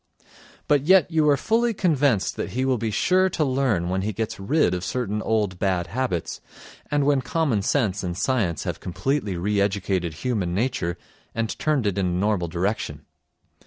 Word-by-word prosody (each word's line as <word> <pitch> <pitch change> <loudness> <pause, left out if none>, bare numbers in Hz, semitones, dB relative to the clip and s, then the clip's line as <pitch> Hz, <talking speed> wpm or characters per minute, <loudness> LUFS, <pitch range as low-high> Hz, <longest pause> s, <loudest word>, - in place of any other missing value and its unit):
But 145 -1 +2
yet 185 -3 +5
you 155 -2 +3
are 140 - +4
fully 230 - +1
convinced 145 - +1
that - - -4
he 130 +2 0
will 130 -3 +1
be 115 0 -1
sure 185 - +2
to 160 -3 0
learn 130 -10 +1
when 95 +1 -1
he 105 +2 -2
gets 110 +1 -4
rid 145 +9 +2
of 90 0 -3
certain 105 -2 -2
old 105 -5 0
bad 95 -3 0
habits, 120 -8 -3 0.5
and 145 -1 +1
when 140 -2 +3
common 130 -4 0
sense 105 -3 0
and 90 -1 -3
science 100 - 0
have - - -4
completely 95 +2 -2
re 100 +3 0
educated 95 -4 -1
human 100 -5 -2
nature 100 -6 -1 0.4
and 115 -1 -1
turned 150 -6 +1
it 100 -1 0
in 95 - +1
a 90 0 -1
normal 100 -2 +1
direction. 85 -4 -3
110 Hz, 180 wpm, -24 LUFS, 95-140 Hz, 0.5 s, yet